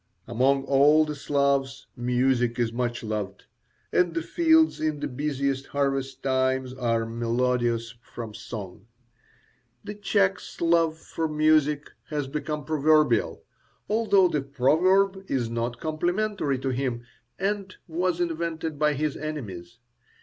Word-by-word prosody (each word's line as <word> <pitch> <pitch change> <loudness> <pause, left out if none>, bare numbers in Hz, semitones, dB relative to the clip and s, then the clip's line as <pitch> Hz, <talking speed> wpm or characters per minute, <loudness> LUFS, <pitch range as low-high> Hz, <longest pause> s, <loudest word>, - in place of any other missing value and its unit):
Among 135 +4 +2
all 145 +3 +5
the 150 - -4
Slavs 140 -1 0
music 125 -1 +1
is 115 -2 0
much 120 -1 -2
loved, 105 -3 -4 0.5
and 175 -2 +2
the 165 - -1
fields 320 - +3
in 155 -1 -1
the 145 - -2
busiest 140 0 -2
harvest 135 -1 -2
time 130 0 +1
are 115 -2 +1
melodious 115 0 0
from 115 -2 -8
song. 105 -2 -8 1.0
The 205 0 -6
Czech's 200 -2 0
love 165 -1 +2
for 160 0 -3
music 150 -1 +2 0.2
has 145 -3 -2
become 150 +1 -4
proverbial, 155 -5 +2 0.4
although 210 -3 +4
the 150 -4 -1
proverb 185 +9 +2
is 120 -4 -1
not 115 +1 -3
complimentary 175 -1 -1
to 135 +1 -3
him 125 -2 -2 0.3
and 195 0 -2
was 175 +1 -1
invented 165 -2 -2
by 150 0 +3
his 150 +1 -1
enemies. 115 - -6
140 Hz, 125 wpm, -26 LUFS, 125-160 Hz, 1.0 s, all